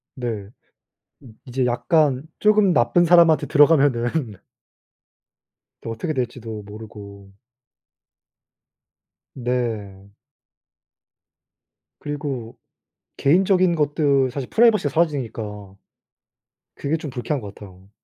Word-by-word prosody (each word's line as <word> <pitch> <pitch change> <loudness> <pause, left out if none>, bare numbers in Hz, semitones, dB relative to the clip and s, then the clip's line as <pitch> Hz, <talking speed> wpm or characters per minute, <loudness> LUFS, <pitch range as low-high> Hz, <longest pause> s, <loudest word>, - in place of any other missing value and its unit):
네. 115 -6 -5 0.7
음. 125 -5 -14
이제 125 0 -1
약간 130 +2 +1 0.2
쪼금 210 -3 +4
나쁜 120 +5 +3
사람한테 170 -2 +5
들어가면은 140 -5 +2 1.5
또 115 - -6
어떻게 115 +8 -3
될지도 115 -5 -5
모르고. 100 -2 -12 2.0
네. 110 -6 -4 1.9
그리고 140 -6 -5 0.6
개인적인 185 +3 +3
것들 145 -3 +1
사실 130 0 -6
프라이버시가 220 -10 +3
사라지니까. 110 - -3 1.0
그게 145 +3 -1
좀 155 -2 -5
불쾌한 130 +2 -3
것 100 -2 -9
같아요. 95 -1 -14
125 Hz, 205 characters per minute, -22 LUFS, 110-155 Hz, 2.0 s, 사람한테